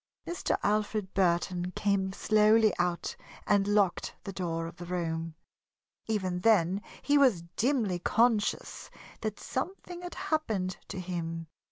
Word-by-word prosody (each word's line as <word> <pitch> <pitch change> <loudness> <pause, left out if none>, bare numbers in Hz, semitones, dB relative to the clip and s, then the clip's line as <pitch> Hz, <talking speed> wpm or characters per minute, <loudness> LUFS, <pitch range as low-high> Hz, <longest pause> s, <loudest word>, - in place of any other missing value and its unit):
Mr. 345 +1 -1
Alfred 210 -2 0
Burton 180 -1 +1
came 195 -2 +1
slowly 215 +1 +4
out 175 -1 -1 0.3
and 200 -1 +3
locked 205 -3 +1
the 195 - -6
door 165 -3 -2
of 165 +1 -8
the 175 - -7
room. 165 -2 -3 0.7
Even 190 -5 -1
then 195 -2 +3 0.2
he 290 0 +4
was 240 -12 +4
dimly 225 -8 +1
conscious 225 +2 +1 0.3
that 215 -2 -3
something 355 +4 -4
had 355 0 -7
happened 215 - -1
to - - -5
him. 165 -2 -4
195 Hz, 130 wpm, -30 LUFS, 175-220 Hz, 0.7 s, slowly